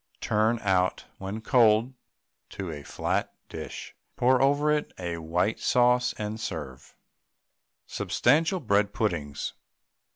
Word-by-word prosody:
Turn 110 +2 +1
out 95 -2 +1
when 100 +3 -5
cold 110 -2 +4
on 130 - -23 0.6
to 95 -4 -4
a 75 -2 -7
flat - - -2
dish, - - -7 0.2
pour 130 +1 +3
over 145 +2 +3
it 150 -1 0
a 85 -2 -4
white 90 +6 0
sauce, 125 0 +3
and 105 +1 -4
serve. 65 - -6 0.9
SUBSTANTIAL 160 +8 +1
BREAD 100 -3 +1
PUDDINGS. 80 -9 -2
110 Hz, 120 wpm, -27 LUFS, 90-125 Hz, 0.9 s, cold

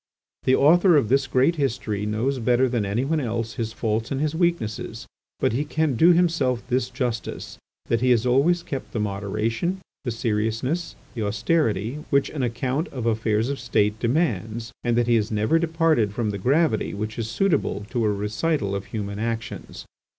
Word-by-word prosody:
The 130 - +5
author 170 +5 +5
of 115 -7 +1
this 135 +1 +3
great 135 +7 +2
history 110 -7 -1
knows 120 +6 -1
better 125 +2 +3
than 120 -5 -1
anyone 135 +10 0
else 115 -3 -2
his 115 -1 -3
faults 110 0 -2
and 135 - -2
his 150 +1 0
weaknesses, 170 - -1 0.3
but - - +1
he 135 +5 0
can 155 -2 0
do 165 +9 +6
himself 165 -9 +1
this 125 -1 +1
justice—that 115 -1 -4
he 130 - +3
has 120 -1 +3
always 145 +8 +3
kept 135 - -6
the 110 - -1
moderation, 105 - -2 0.2
the 130 - -2
seriousness, 115 +8 -1 0.2
the 120 - -4
austerity, 110 - 0
which 140 -1 +2
an 150 - -3
account 130 +6 -1
of 125 -4 -6
affairs 110 0 +1
of 140 -1 -3
State 110 -2 +1
demands, 115 - -1
and 120 -1 +1
that 120 - +3
he 120 - +2
has 110 -1 +2
never 110 +9 +2
departed 160 -10 +2
from 110 -3 0
the 100 - -5
gravity 135 - +1
which 110 +2 -4
is 110 -1 -3
suitable 145 - 0
to 120 - 0
a 105 - +2
recital 105 +3 -1
of 100 0 -3
human 100 -2 -5
actions. 115 0 -4
120 Hz, 175 wpm, -24 LUFS, 110-145 Hz, 0.3 s, do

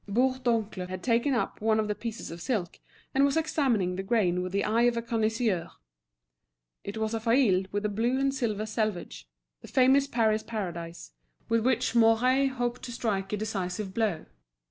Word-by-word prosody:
Bourdoncle 230 -5 0
had 185 0 -6
taken 245 +3 +2
up 235 - -2
one 220 0 +2
of 215 - 0
the 210 - 0
pieces 230 -1 -6
of 170 0 -8
silk, 200 -9 -2 0.3
and 270 - +3
was 280 +2 +2
examining 260 - +1
the - - -1
grain 195 -4 +1
with 185 0 -4
the 200 +1 0
eye 225 +2 +2
of 235 - -4
a - - 0
connoisseur. 225 -5 0 1.1
It 200 +2 -6
was 220 0 -1
a 225 - -1
faille 225 -5 +3
with 205 +1 -2
a - - +1
blue 235 +5 0
and 275 0 +1
silver 220 -6 -1
selvage, 205 - -3 0.3
the - - -11
famous 270 +2 +4
Paris 220 -4 +1
Paradise, 170 - -6 0.4
with 230 -1 +2
which 255 0 +1
Mouret 240 +4 +4
hoped 245 -1 -2
to 245 - -6
strike 200 -5 -2
a 210 - -1
decisive 195 -2 -3
blow. 205 -8 -1
220 Hz, 180 wpm, -28 LUFS, 195-245 Hz, 1.1 s, famous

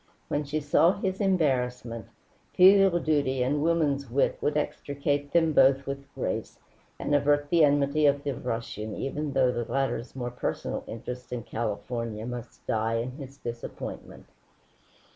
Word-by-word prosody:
When 145 - 0
she 150 +2 -2
saw 160 +4 +4
his 190 0 -3
embarrassment, 125 - 0 0.5
filial 190 -1 +7
duty 140 -5 +1
and 145 +3 0
woman's 150 -5 +1
wit 135 +4 +2
would 150 0 +1
extricate 145 -1 -2
them 165 -2 +3
both 135 0 +5
with 140 0 -6
grace - - -3 0.4
and 145 - -2
avert 145 0 +2
the 170 -2 +5
enmity 145 +1 +3
of 140 0 +2
the 140 -1 -1
Russian 115 -3 -4
even 145 +1 -3
though 130 -2 +3
the 120 -1 -4
latter's 130 -2 -1
more 125 -2 -3
personal 125 - -3
interest 125 +2 -7
in 120 -2 -3
California 110 0 -4
must 120 -1 -8
die 110 +1 0
in 115 +2 -2
his 135 0 -10
disappointment. 120 -2 -7
140 Hz, 145 wpm, -27 LUFS, 120-150 Hz, 0.5 s, filial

